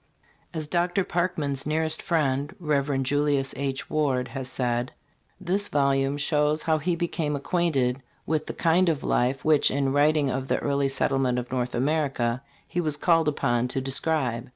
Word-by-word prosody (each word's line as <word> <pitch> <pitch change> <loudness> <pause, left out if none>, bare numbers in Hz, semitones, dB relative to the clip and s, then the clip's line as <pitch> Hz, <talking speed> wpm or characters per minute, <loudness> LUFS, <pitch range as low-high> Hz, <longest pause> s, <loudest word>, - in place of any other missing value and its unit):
As 155 -3 -4
Dr. 175 +4 +1
Parkman's 155 -7 -1
nearest 160 +1 +1
friend, 145 -5 0
Rev. 140 -4 0
Julius 145 0 +1
H. 135 -1 -3
Ward,* 135 -5 0
has 130 -1 -5
said: 125 -1 -1 0.5
"This 190 +3 -1
volume 140 0 +1
shows 150 +1 +1
how 160 -1 +1
he 170 +3 0
became 165 -3 -2
acquainted 140 -5 0 0.2
with 155 0 -1
the - - -4
kind 170 +2 +3
of 155 -4 -1
life 130 +2 0
which 155 -2 +4
in 135 0 0
writing 145 -1 +3
of 130 0 -3
the - - +1
early 140 -1 0
settlement 135 -2 +1
of 125 0 -4
North 125 -1 -2
America 135 -3 0 0.3
he 175 - -1
was 155 -3 -2
called 165 0 +3
upon 120 -4 +1
to 130 - -2
describe. 130 -3 -1
145 Hz, 160 wpm, -26 LUFS, 135-160 Hz, 0.5 s, which